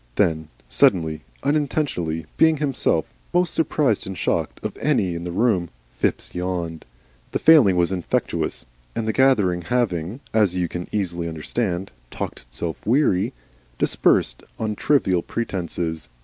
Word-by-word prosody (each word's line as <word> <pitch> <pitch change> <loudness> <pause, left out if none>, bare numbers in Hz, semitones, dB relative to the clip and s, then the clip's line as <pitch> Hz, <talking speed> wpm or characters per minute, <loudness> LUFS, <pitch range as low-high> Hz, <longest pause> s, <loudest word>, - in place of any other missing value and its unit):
Then 80 -1 +1 0.2
suddenly, 80 -3 +3 0.2
unintentionally, 140 - 0
being 160 -1 +4
himself 135 - +1 0.3
most 180 -2 +2
surprised 145 -10 +1
and 95 -1 -5
shocked - - -1
of - - -3
any 90 -3 +1
in 85 +1 -5
the 90 - -3
room, 95 -3 +1 0.2
Phipps - - -1
yawned. 90 -3 -3 0.5
The - - +2
failing 145 - +6
was 90 0 +2
infectious, 90 -3 -1 0.3
and 110 - -2
the 110 - +1
gathering 105 -10 +3
having, 105 -2 -1
as 105 -5 +3
you 90 -1 0
can 90 +1 -5
easily 85 -5 -2
understand, 90 +4 -2 0.2
talked - - -5
itself 60 +7 -6
weary, 115 -3 +2 0.4
dispersed - - +2 0.2
on 110 -1 -2
trivial 95 -10 +2
pretences. 85 -7 -3
95 Hz, 135 wpm, -23 LUFS, 85-120 Hz, 0.5 s, failing